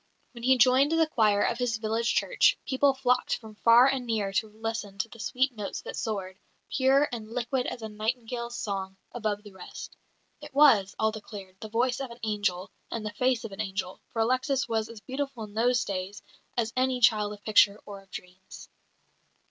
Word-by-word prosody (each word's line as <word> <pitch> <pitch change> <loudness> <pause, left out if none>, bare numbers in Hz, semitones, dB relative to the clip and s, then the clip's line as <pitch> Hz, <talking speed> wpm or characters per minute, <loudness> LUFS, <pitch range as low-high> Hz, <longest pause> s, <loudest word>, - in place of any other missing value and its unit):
When 235 - -11
he 260 +2 +4
joined 260 +5 +5
the 325 0 +4
choir 215 -8 +2
of 235 - 0
his 245 -2 0
village 225 +2 0
church, - - +3
people 275 0 +3
flocked 250 -1 +1
from 220 -2 -11
far 230 +3 +6
and 265 -2 0
near 210 -4 -1
to 220 +1 0
listen 215 -2 -5
to 220 - -1
the 230 - -13
sweet 255 +4 0
notes 210 -2 -5
that - - -7
soared, 195 -3 -4 0.3
pure 275 +1 +4
and 220 -3 -6
liquid 250 +2 -1
as 235 - -5
a - - -3
nightingale's 235 +2 -3
song, 195 -3 -4
above 215 -3 -2
the 205 - -12
rest. 190 -1 -10 0.5
"It - - -11
was," 225 -10 +5
all 220 0 +2
declared, 205 -3 -10
"the 220 - -8
voice 245 +3 +1
of 270 -2 -4
an 235 +1 -11
angel 205 -4 -1 0.2
and 225 -2 -4
the 210 - -4
face 250 -2 +1
of 225 - -6
an 195 +2 -4
angel," 190 -2 -4
for 225 - 0
Alexis 260 +3 +1
was 220 -1 -1
as 230 -2 -10
beautiful 265 -1 -4
in 210 -1 -10
those 245 +2 +2
days 195 +1 -5 0.3
as 230 -1 0
any 255 0 +1
child 215 -3 +3
of 205 0 -13
picture 205 -1 +4
or 200 -1 -9
of 195 - -24
dreams. 185 +1 -11
225 Hz, 195 wpm, -28 LUFS, 205-250 Hz, 0.5 s, far